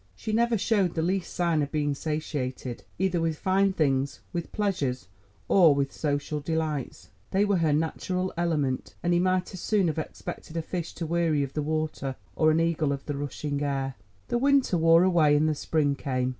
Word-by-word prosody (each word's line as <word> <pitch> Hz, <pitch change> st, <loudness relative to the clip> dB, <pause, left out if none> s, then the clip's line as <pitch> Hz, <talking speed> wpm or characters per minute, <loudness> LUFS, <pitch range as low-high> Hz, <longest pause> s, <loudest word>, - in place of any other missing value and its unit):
She 215 Hz, -, -4 dB
never 235 Hz, +1 st, +3 dB
showed 200 Hz, -3 st, +1 dB
the 160 Hz, -, 0 dB
least 185 Hz, +1 st, -1 dB
sign 170 Hz, -3 st, +1 dB
of 145 Hz, -1 st, -2 dB
being 145 Hz, -2 st, 0 dB
satiated, 135 Hz, -5 st, -4 dB
either 180 Hz, -2 st, +1 dB
with 165 Hz, -2 st, 0 dB
fine 195 Hz, +3 st, +2 dB
things, 140 Hz, -5 st, 0 dB
with 170 Hz, -1 st, -4 dB
pleasures, 180 Hz, -, -1 dB, 0.4 s
or 170 Hz, -7 st, +6 dB
with 140 Hz, -1 st, -1 dB
social 145 Hz, 0 st, -2 dB
delights. 150 Hz, -, -3 dB, 0.2 s
They 200 Hz, +2 st, +2 dB
were 200 Hz, -2 st, +2 dB
her 160 Hz, -3 st, +2 dB
natural 180 Hz, +4 st, -1 dB
element, 155 Hz, -7 st, -1 dB
and 175 Hz, 0 st, +2 dB
he 175 Hz, -, +3 dB
might 185 Hz, +1 st, +1 dB
as 185 Hz, -, -6 dB
soon 200 Hz, -4 st, +2 dB
have 160 Hz, -, -2 dB
expected 155 Hz, +1 st, -7 dB
a 165 Hz, -, -1 dB
fish 170 Hz, -1 st, -5 dB
to 165 Hz, -, -4 dB
weary 165 Hz, -3 st, +1 dB
of 135 Hz, -, -5 dB
the 150 Hz, -, -1 dB
water, 155 Hz, -3 st, -2 dB, 0.2 s
or 155 Hz, -, +4 dB
an 155 Hz, +1 st, +3 dB
eagle 165 Hz, -3 st, +1 dB
of 140 Hz, -1 st, -4 dB
the 145 Hz, -, -3 dB
rushing 145 Hz, +1 st, -3 dB
air. 135 Hz, -2 st, -1 dB, 0.4 s
The 240 Hz, -, +1 dB
winter 275 Hz, -6 st, +3 dB
wore 165 Hz, +1 st, +5 dB
away 165 Hz, -5 st, +4 dB
and 150 Hz, +2 st, +3 dB
the 155 Hz, -, +2 dB
spring 145 Hz, -1 st, 0 dB
came. 130 Hz, -2 st, -1 dB
160 Hz, 195 wpm, -27 LUFS, 145-180 Hz, 0.4 s, or